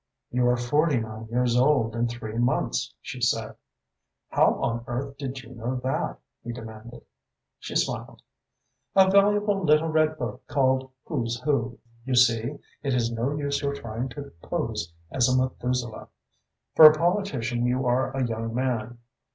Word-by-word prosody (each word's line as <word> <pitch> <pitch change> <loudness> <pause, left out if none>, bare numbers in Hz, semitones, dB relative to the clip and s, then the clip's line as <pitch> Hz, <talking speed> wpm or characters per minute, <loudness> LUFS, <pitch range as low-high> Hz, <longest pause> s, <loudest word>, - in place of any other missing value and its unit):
"You 125 0 +2
are 125 - +3
forty 145 +3 +2
nine 110 0 -7
years 120 +1 +1
old 125 -4 +3
and 120 0 0
three 115 -1 -5
months," 120 - 0
she - - -7
said. - - 0 0.8
"How - - +3
on 115 0 -2
earth 135 +3 -4
did 135 -2 -5
you 115 - -12
know 120 +2 -3
that?" 130 +1 -2 0.3
he 120 - -5
demanded. 115 0 -10 0.6
She - - -7
smiled. - - -2 0.7
"A 190 -1 +6
valuable 205 0 +3
little 155 0 +4
red 155 0 +2
book 120 0 -5
called 130 -1 +1 0.2
'Who's 120 -6 -2
Who.' 130 -4 0 0.3
You 130 0 -1
see, 120 +2 +3 0.2
it 135 -3 0
is 115 -1 +1
no 120 +5 -1
use 140 -1 -1
your 140 -1 -1
trying 115 0 -5
to 140 +3 -8
pose 85 - -3 0.2
as 125 -1 +2
a 130 - +3
Methuselah. 125 -2 -2 0.7
For 160 - +9
a 155 - -1
politician 145 - 0
you 125 +1 0
are 125 +2 +2
a 130 - +1
young 115 0 -3
man. 120 -2 -2
125 Hz, 160 wpm, -26 LUFS, 120-140 Hz, 0.8 s, For